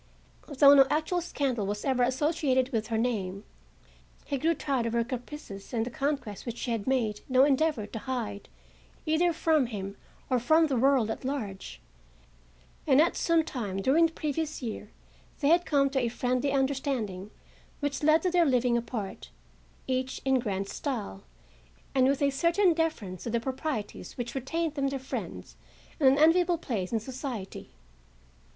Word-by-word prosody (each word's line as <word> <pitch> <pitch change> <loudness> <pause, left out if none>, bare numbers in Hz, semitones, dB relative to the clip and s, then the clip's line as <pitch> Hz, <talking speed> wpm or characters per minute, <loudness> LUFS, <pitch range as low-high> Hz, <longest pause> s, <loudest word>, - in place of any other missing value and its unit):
Though 280 +1 +6
no 270 -1 +7
actual 320 +4 0
scandal 265 - -2
was 205 +1 -3
ever 260 -2 +1
associated 260 0 +1
with 220 -4 -2
her 225 - -1
name, 205 -5 -2 0.8
he 280 -2 -2
grew 330 +4 +2
tired 270 -6 -1
of 230 - -3
her 235 0 +2
caprices, 245 -3 -7
and 225 -1 +1
the 245 - -5
conquests 275 -6 -3
which 235 -1 -5
she 235 -1 -1
made 230 -6 0
no 260 0 +5
endeavor 285 -4 +2
to 225 - -7
hide 225 -5 -4 0.6
either 330 +2 +2
from 315 -4 +2
him 200 -3 -6 0.3
or 255 -2 +2
from 315 +7 +4
the 280 -4 -1
world 255 -3 +3
at - - -6
large; 200 - -5 1.1
and 265 - +5
at 330 +3 +4
some 335 -1 +2
time 215 -11 -4
during 295 +11 +4
the - - -13
previous 310 +1 -3
year 220 -4 -6 0.5
they 285 - +2
had 345 +1 +4
come 280 -2 +3
to 270 - +1
a 245 - 0
friendly 250 +3 0
understanding 265 -8 -1 0.5
which 285 -1 -2
led 310 +3 +4
to 365 - +1
their 350 -1 +4
living 250 -4 +2
apart, 230 -4 -4 0.6
each 260 0 -2
in 265 -1 +3
grand 200 -4 -2
style 210 -7 -5 0.7
and 260 -1 +4
with 280 +1 +1
a 280 - +3
certain 345 +6 +3
deference 310 - -2
to - - -4
the 235 +1 0
proprieties 260 -3 -4
which 240 -1 -4
retained 315 +4 -2
them 275 -2 0
their 275 0 -2
friends 265 0 -6 0.4
and 275 -4 +6
an 270 - +3
enviable 340 +3 +4
place 210 - -3
in 225 - +1
society. 245 -4 -6
260 Hz, 165 wpm, -28 LUFS, 230-295 Hz, 1.1 s, no